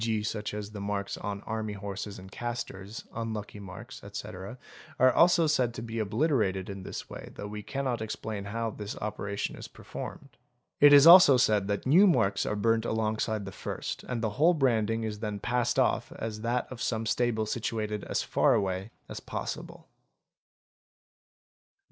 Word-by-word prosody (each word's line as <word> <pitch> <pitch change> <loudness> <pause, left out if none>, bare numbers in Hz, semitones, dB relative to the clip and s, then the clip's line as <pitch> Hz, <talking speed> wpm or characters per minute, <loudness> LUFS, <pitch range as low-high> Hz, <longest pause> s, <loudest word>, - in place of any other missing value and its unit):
g., 110 -2 0
such 105 -1 -3
as 105 0 -6
the 105 -2 -7
marks 100 -1 -2
on 100 -1 -4
army 110 -1 -3
horses 100 0 -6
and 95 0 -11
casters, 115 -3 -5
unlucky 110 -3 -5
I - - -9
marks, 110 +7 -10
etc., 100 +2 -7 0.4
are 130 0 +5
also 170 -1 +5
said 130 -6 +1
to 115 - -5
be 115 0 -4
obliterated 105 - 0
in 100 -1 -7
this 95 - -6
way - - -9
though - - -6
we 105 0 -6
cannot 130 +2 -2
_ - - -9
explain 110 -2 -4
how 115 +2 -2
this 105 0 -6
operation 100 -1 -3
is - - -8
performed. - - -8 0.5
It 145 0 +8
is 145 0 +9
also 170 -6 +10
said 105 -5 +3
that 100 0 -2
new 175 +10 +6
marks 100 - +2
_ - - -1
are - - 0
burnt 115 +2 +2
alongside 110 -2 -1
the 95 - -6
first - - -5
and 120 -3 -3
the 110 - 0
whole 170 +2 +6
branding 115 -5 +1
is 105 -1 -4
then 105 -2 -3
passed 125 +2 0
off - - +2
as 110 -1 -5
that 120 +2 0
of 125 -1 -7
some 115 -1 -1
stable 120 -2 +1
situated 105 -2 -2
as - - -1
far - - +3
away 95 +1 -1 0.2
as - - -6
possible. - - -6
110 Hz, 180 wpm, -29 LUFS, 100-120 Hz, 0.5 s, also